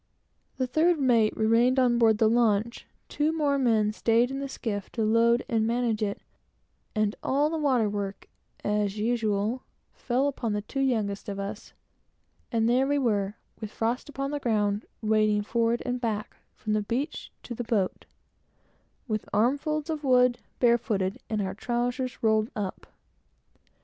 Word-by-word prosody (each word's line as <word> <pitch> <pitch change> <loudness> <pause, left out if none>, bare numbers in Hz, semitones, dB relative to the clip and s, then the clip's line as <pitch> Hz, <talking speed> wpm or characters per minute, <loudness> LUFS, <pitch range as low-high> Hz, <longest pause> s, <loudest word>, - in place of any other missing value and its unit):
The 260 - +1
third 315 +6 +2
mate 235 -5 +3
remained 230 +4 +3
on 245 -2 +3
board 225 -2 +5
the 220 - +4
launch, 230 0 +1 0.2
two 300 +1 0
more 290 -3 +1
men 220 -5 +2
staid 230 +3 +2
in 270 - -3
the 275 0 -4
skiff, 205 -6 -4
to 225 - -1
load 230 +2 +3
and 225 -2 +1
manage 230 -2 0
it, 200 -1 -2 0.7
and 215 0 +1
all 290 +3 +1
the 325 - -1
water 260 -7 +2
work, 200 -1 -4 0.4
as 210 -1 0
usual, 220 +1 0 0.3
fell 260 +3 0
upon 240 -6 -2
the 205 0 -2
two 275 - -5
youngest 215 -7 0
of 200 0 -4
us; 200 +2 -6 0.8
and 225 -2 +2
there 255 +3 +3
we 285 +1 +1
were, 205 -6 0 0.2
with 215 -2 -5
frost 230 +6 -2
on 275 +1 -2
the 290 - -2
ground, 210 -4 0 0.2
wading 215 -1 +2
forward 230 +2 0
and 250 0 -2
back, 215 -3 -3 0.2
from 215 - -3
the 215 - +2
beach 245 +8 -3
to 240 - -6
the 245 - -4
boat, 220 -5 -1 1.0
with 215 -2 -3
armsfull 285 +8 +1
of 310 -2 -3
wood, 250 -2 +4 0.2
barefooted, 225 -6 +1
and 215 -2 -1
our 190 0 -3
trowsers 245 +3 -2
rolled 220 0 +3
up. 200 -3 -5
230 Hz, 160 wpm, -27 LUFS, 215-255 Hz, 1.0 s, board